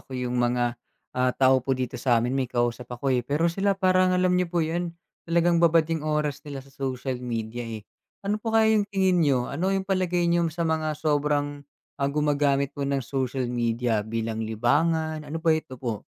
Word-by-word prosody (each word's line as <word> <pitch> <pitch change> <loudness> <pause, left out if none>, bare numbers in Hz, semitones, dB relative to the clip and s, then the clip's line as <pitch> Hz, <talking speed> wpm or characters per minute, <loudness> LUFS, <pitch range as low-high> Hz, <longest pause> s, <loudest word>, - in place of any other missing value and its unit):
ko 130 - -8
yung 125 -1 -1
mga, 120 0 0 0.3
ah, 125 0 0
tao 130 0 +4
po 135 +1 -1
dito 125 -1 -4
s'amin 120 -1 +2
may 135 -2 0
kausap 120 0 -1
ako, 135 +2 0
eh. 125 - +2
Pero 145 +7 -1
sila 195 +1 +1
parang 185 -1 +3
alam 180 0 +2
niyo 180 -1 +1
po 170 -1 0
yun? 170 +1 -3 0.3
Talagang 170 0 +3
babad 165 -1 +5
yung 160 - -1
oras 150 -1 -1
nila 135 -2 -6
sa 135 - -19
social 130 -2 -3
media, 115 -1 -4
eh. 115 -3 -6 0.4
Ano 210 +2 -1
po 225 0 0
kaya 220 0 +5
yung 210 -1 +2
tingin 190 -3 +2
niyo? 135 -6 +2
Ano 170 +7 -1
yung 195 0 0
palagay 185 -2 0
niyo 170 -1 +2
sa 165 +2 -3
mga 155 -1 0
sobrang, 145 -1 0 0.4
ah, 140 - +2
gumagamit 140 -1 +1
po 140 -1 -3
ng 135 -3 -1
social 130 -1 -2
media 120 -1 0
bilang 110 +1 -3
libangan, 155 +8 0
ano 155 - -4
ba 160 - +5
ito 155 -5 -3
po? 115 -4 -4
145 Hz, 195 wpm, -26 LUFS, 125-170 Hz, 0.4 s, babad